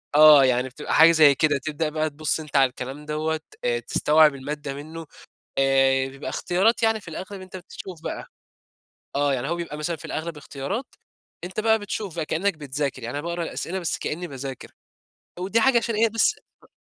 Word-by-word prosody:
آه، 150 -2 +9
يعني 125 0 +1
بتبقى 125 - -5
حاجة 165 +1 +8
زي 155 -4 +6
كده 145 0 +2
تبدأ 155 0 -2
بقى 155 0 -1
تبص 155 +2 -1
أنت 150 -2 -10
على 135 -2 +5
الكلام 130 +4 -8
دوّة، 155 +1 -1 0.2
آآ 485 -1 +1
تستوعب 155 - +3
المادة 145 +1 -5
منه، 160 +3 -8 0.5
آآ 135 -1 +3
بيبقى 135 +1 -8
اختيارات 195 +7 +1
يعني 225 -1 +2
في 190 - -13
الأغلب 190 +4 -7
أنت 185 0 -10
بتشوف 180 -1 -10
بقى. - - -5 0.9
آه، 145 -1 +2
يعني 130 +3 -3
هو 170 - -1
بيبقى 170 -3 -5
مثلًا 150 +3 -3
في 145 - -15
الأغلب 160 0 -4
اختيارات، 150 - -5 0.5
أنت 185 +4 -4
بقى 220 0 +3
بتشوف 205 -3 -5
بقى 160 -2 -2
كأنك 190 +5 0
بتذاكر، 140 -3 -4
يعني 120 +5 -4
أنا - - -5
باقرأ 170 0 -2
الأسئلة 170 +2 -4
بس 175 -3 -2
كأني 175 +4 -4
باذاكر، 135 -2 -7 0.7
ودي 200 +5 +1
حاجة 265 0 +5
عشان 230 -1 0
إيه، 225 +2 +3
بس 225 +1 +2 0.3
أ - - -19
155 Hz, 190 wpm, -24 LUFS, 140-185 Hz, 0.9 s, آه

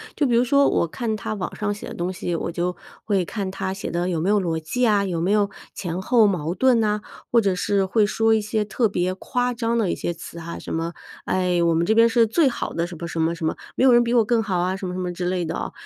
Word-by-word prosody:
就 300 - +1
比 250 - +1
如 235 - +4
说 280 +3 +4
我 - - +1
看 220 +5 -3
它 210 - -4
网 195 -4 -4
上 205 -1 -1
写 205 - -9
的 - - -7
东 175 +2 -2
西， 175 -1 -3
我 - - -3
就 175 +1 -2 0.3
会 195 -4 +1
看 195 -1 -4
它 190 0 -3
写 195 - -5
的 175 +1 -1
有 165 -3 -1
没 180 - 0
有 210 0 +4
逻 170 -4 -1
辑 160 +11 -4
呀， 210 -4 +4
有 180 -4 -2
没 175 +4 0
有 205 -1 +2 0.2
前 175 0 -4
后 230 +2 +4
矛 175 -5 0
盾 255 0 +4
呐， 210 -1 +1 0.3
或 235 - +4
者 195 -3 +1
是 195 +2 +1
会 210 +3 +2
说 225 +2 +2
一 220 - +2
些 210 +1 -1
特 220 +3 0
别 185 -2 -1
夸 245 +5 -1
张 230 0 -1
的 205 -6 +1
一 - - -1
些 175 - -3
词 170 0 -10
哈， 170 0 -6
什 - - -7
么， 165 +1 -2 0.3
哎， 180 -1 +1
我 170 -1 +3
们 165 +1 +2
这 220 - +3
边 230 +1 +6
是 230 0 +4
最 275 +8 +3
好 240 - -4
的 170 +1 -1
什 175 -1 -9
么 170 - -6
什 165 - -4
么 165 +1 +1
什 165 - -4
么， 160 - 0 0.2
没 - - +1
有 260 - +7
人 240 0 +6
比 235 0 -1
我 235 -2 +5
更 230 +1 +2
好 195 -4 -1
啊， 180 +2 0
什 190 - -5
么 180 - -4
什 185 - -4
么 180 -1 -2
之 175 +1 -4
类 180 -1 -1
的 160 - -3
啊， - - -4
195 Hz, 315 characters per minute, -23 LUFS, 175-225 Hz, 0.3 s, 有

